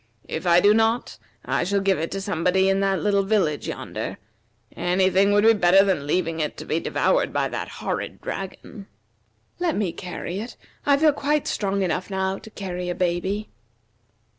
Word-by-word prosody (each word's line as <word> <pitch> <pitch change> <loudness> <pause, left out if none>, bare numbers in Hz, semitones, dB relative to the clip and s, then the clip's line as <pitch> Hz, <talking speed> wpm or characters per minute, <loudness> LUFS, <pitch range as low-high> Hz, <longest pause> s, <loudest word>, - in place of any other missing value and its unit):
If 165 +3 -4
I 175 +1 +6
do 205 +2 +6
not, 225 +2 +1 0.3
I - - 0
shall 200 +3 +1
give 195 -3 +1
it 165 - -2
to 195 - -4
somebody 190 0 +1
in 195 0 +2
that 195 -1 0
little 200 -1 +3
village 195 -7 0
yonder. - - -5 0.6
Any 185 +1 +2
thing 200 +2 +4
would 205 0 +4
be 225 +1 +7
better 195 -1 +5
than 150 -8 0
leaving 165 0 0
it 150 -1 -2
to - - -7
be 160 - 0
devoured - - +1
by - - 0
that - - -4
horrid - - -4
dragon." 195 +2 -7 0.7
"Let 350 -3 0
me 200 -5 0
carry 180 +1 -6
it. 230 +4 -7 0.3
I 280 -1 +5
feel 305 0 +4
quite 290 +1 0
strong 200 -1 -1
enough 180 +1 -2
now 190 0 -1
to - - -12
carry 180 -4 -5
a 175 - -2
baby." 185 +4 -1
195 Hz, 185 wpm, -24 LUFS, 180-205 Hz, 0.7 s, be